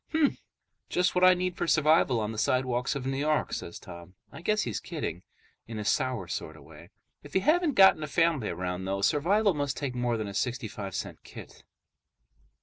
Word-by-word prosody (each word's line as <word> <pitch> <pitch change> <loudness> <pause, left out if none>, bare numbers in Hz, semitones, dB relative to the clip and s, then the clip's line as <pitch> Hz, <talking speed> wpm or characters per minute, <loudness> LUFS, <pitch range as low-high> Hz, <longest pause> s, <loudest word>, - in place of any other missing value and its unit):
"Hmm. 315 -2 +4 0.6
Just 180 0 +1
what 180 - +1
I 185 0 +8
need 180 0 -2
for - - -2
survival 155 -6 +3
on 105 0 -2
the 110 - -5
sidewalks 125 +1 0
of 135 -2 -4
New 135 0 -2
York," 150 +1 0
says - - -5
Tom. 85 +2 -12 0.2
I - - -10
guess 215 +4 +1
he's - - -3
kidding, 90 - -5 0.5
in 115 -1 -6
a 105 - -4
sour 120 -3 0
sort 80 -1 -5
of 75 - -15
way. - - -14 0.3
If 145 - -14
you 190 - +3
haven't 315 - +2
got 190 -5 +7
a 155 - -3
family 165 -6 +1
around, 90 +1 -4
though, 100 +1 -2
survival 195 - +3
must 145 -3 -2
take 140 -3 -3
more 120 -1 -1
than 110 -1 -3
a 100 - -6
sixty 125 +3 -2
five 100 -2 -7
cent - - -5
kit. - - -12
135 Hz, 205 wpm, -28 LUFS, 105-170 Hz, 0.6 s, I